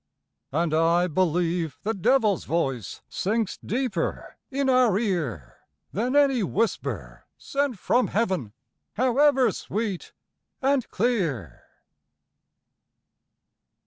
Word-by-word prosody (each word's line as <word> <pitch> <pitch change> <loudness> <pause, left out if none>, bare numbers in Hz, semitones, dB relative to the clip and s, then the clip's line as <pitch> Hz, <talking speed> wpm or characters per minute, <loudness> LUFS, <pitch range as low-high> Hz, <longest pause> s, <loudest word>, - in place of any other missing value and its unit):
And 160 +2 0
I 165 +2 +3
believe 170 -2 0
the 220 +2 0
devilÆs 210 -1 +2
voice 135 - -2
Sinks 215 +1 -1
deeper 235 -7 -2
in 275 0 -1
our 255 -6 +4
ear 165 - -2 0.3
Than 245 +7 -1
any 275 -4 +4
whisper 215 +3 -2
sent 280 -4 -2
from 245 +6 +2
Heaven, 185 - -1 0.4
However 260 +2 +3
sweet 205 -4 -4 0.5
and 270 -2 +1
clear. 170 - -1
205 Hz, 90 wpm, -25 LUFS, 170-250 Hz, 0.5 s, our